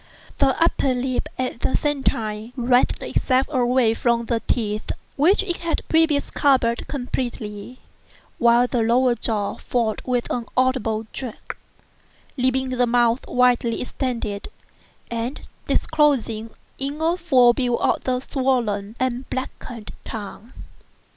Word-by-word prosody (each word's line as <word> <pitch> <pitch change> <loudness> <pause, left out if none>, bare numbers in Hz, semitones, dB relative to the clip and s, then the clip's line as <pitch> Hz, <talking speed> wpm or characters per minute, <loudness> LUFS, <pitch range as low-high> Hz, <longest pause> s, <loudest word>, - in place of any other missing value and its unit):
The 270 -1 +3
upper 280 -5 +2
lip, 255 +3 -2
at 255 -2 -3
the - - +1
same 290 -2 -1
time, 215 -1 -2
writhed 245 0 +2
itself 260 0 +1
away 250 -3 +3
from 235 0 +1
the 230 -1 0
teeth, 215 -3 -1 0.3
which 355 +8 +4
it 350 -3 -2
had 335 -1 -3
previously 320 -3 +2
covered 255 -5 +2
completely; 245 -4 -4 0.6
while 235 +1 +5
the 245 -1 0
lower 240 +2 +3
jaw 215 -3 -2
fell 230 -3 -1
with 245 -2 -1
an 240 -2 -2
audible 255 -4 +1
jerk, 250 -5 -6 0.8
leaving 260 0 +1
the 250 -1 +1
mouth 240 +1 +2
widely 245 -2 +2
extended, 235 -6 -3 0.6
and 235 +4 -3 0.3
disclosing 260 -8 +1 0.3
in 280 +2 -3 0.2
full 260 -9 +5
view 245 -1 0 0.3
the 255 -1 0
swollen 235 -7 -1
and 255 0 -2
blackened 245 -3 -6
tongue. 220 +2 -8
245 Hz, 120 wpm, -22 LUFS, 230-265 Hz, 0.8 s, while